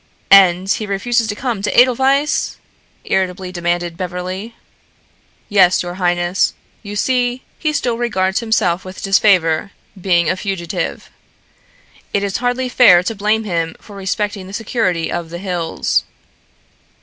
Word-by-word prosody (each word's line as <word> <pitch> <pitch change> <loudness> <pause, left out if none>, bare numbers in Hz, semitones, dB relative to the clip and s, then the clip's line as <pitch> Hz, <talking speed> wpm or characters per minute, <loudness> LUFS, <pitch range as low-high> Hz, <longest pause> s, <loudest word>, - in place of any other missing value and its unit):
"And 190 -1 +6
he 210 +2 -1
refuses 225 +4 0
to 205 - -3
come 235 -4 -3
to 210 - +2
Edelweiss?" 265 +4 +2 0.5
irritably 185 -1 -1
demanded 175 -1 -2
Beverly. 185 +5 -5 0.9
"Yes, 185 -4 +4
your 175 0 -5
highness. 175 +1 +1 0.3
You 205 -1 -8
see, 250 +2 0 0.2
he 310 - 0
still 245 -6 -1
regards 190 -5 0
himself 205 -6 0
with 185 0 -9
disfavor, 195 -4 +3 0.3
being 175 -3 +2
a 185 - +1
fugitive. 190 -3 -4 1.0
It 200 - +1
is 200 -1 -1
hardly 245 +1 -1
fair 230 -8 +6
to 225 - -2
blame 215 +2 0
him 165 -5 -2
for 205 - -14
respecting 195 0 -3
the 195 - -11
security 200 -6 -1
of 170 -1 -4
the 170 - -6
hills." 175 -3 -1
195 Hz, 135 wpm, -17 LUFS, 180-225 Hz, 1.0 s, And